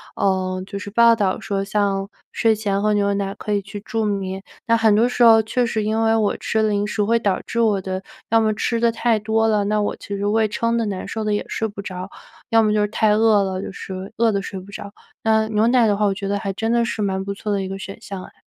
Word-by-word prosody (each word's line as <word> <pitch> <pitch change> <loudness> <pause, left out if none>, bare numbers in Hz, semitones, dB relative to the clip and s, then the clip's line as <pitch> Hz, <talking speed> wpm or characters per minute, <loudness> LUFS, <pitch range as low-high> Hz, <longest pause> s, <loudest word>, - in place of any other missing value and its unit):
呃， 185 -1 0
就 200 - -6
是 205 - -7
报 230 +2 +5
道 200 -4 0
说 195 -1 -2
像 200 -1 -1 0.2
睡 225 -1 +2
前 200 -2 -1
喝 210 0 +2
牛 200 -1 +1
奶 200 -1 -2
可 210 - -5
以 205 - +1
去 200 +1 -8
助 220 +1 -2
眠。 195 -2 -3 0.2
那 230 - +4
很 225 -2 +4
多 225 +3 +4
时 245 0 +1
候 225 -1 +8
确 245 +3 0
实 220 -2 -1
因 220 +1 0
为 225 0 +3
我 215 -2 +1
吃 220 0 0
零 205 -1 +1
食 210 0 -1
会 230 +3 +2
导 200 -4 0
致 230 - -3
我 215 -3 +2
的 185 0 -4 0.3
要 225 - +4
么 215 -1 +2
吃 230 +2 -1
得 235 0 +3
太 230 0 +1
多 220 +1 +1
了， 210 -2 +2
那 210 +1 +1
我 205 - -1
其 200 - -7
实 200 - -2
胃 215 +1 +2
撑 230 +2 -1
得 230 - 0
难 195 -2 -4
受 220 - -4
得 210 -1 0
也 205 - -1
睡 225 - -2
不 205 -1 -11
着。 185 -1 -6 0.4
要 225 0 +5
么 210 -1 +2
就 210 - +2
是 210 - +2
太 215 0 +2
饿 215 -1 +4
了， 190 -1 -3
就 - - -6
是 190 0 -7
饿 230 0 +3
得 200 -1 -1
睡 195 -1 -6
不 190 +2 -13
着。 200 0 -8 0.3
那 220 0 +3
牛 215 +1 +2
奶 245 -1 +4
的 205 - +2
话， 210 - +2
我 200 - +2
觉 195 0 -5
得 200 +1 0
还 195 - -3
真 225 +4 -2
的 235 0 +3
是 225 -2 -3
蛮 190 -1 -1
不 200 0 -4
错 210 +1 -4
的 200 -1 0
一 190 - -4
个 195 +1 -5
选 195 0 -8
项 195 -2 -7
哎。 - - -13
210 Hz, 295 characters per minute, -21 LUFS, 195-225 Hz, 0.4 s, 候